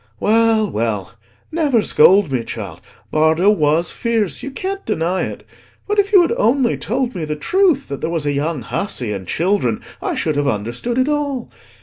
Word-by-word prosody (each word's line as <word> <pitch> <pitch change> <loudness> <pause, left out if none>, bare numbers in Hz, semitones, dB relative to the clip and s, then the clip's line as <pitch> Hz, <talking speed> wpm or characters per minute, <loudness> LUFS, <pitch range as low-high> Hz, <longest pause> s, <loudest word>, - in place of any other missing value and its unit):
Well, 225 0 +3
well; 105 - -2 0.4
never 290 -9 +2
scold 185 0 +5
me, 125 -3 -1
child: 100 -8 -7 0.3
Bardo 160 +6 +3
was 160 -3 +1
fierce, 220 - -1
you - - -5
can't 385 +8 -4
deny 170 +4 -1
it. - - -8 0.4
But 415 0 +1
if 400 0 +2
you 385 -4 +7
had 335 - 0
only 240 +2 +2
told 250 +2 -2
me 175 - -4
the 150 0 -3
truth, 345 - +1
that 140 - -5
there - - -1
was 165 -3 -2
a 145 - 0
young 145 -1 -2
hussey 125 - -2
and 95 -3 -6
children, 170 - 0 0.2
I - - -2
should 155 -2 -1
have 145 -1 +1
understood 120 - -2
it 260 +1 +2
all. 285 -4 -2
190 Hz, 185 wpm, -19 LUFS, -, 0.4 s, you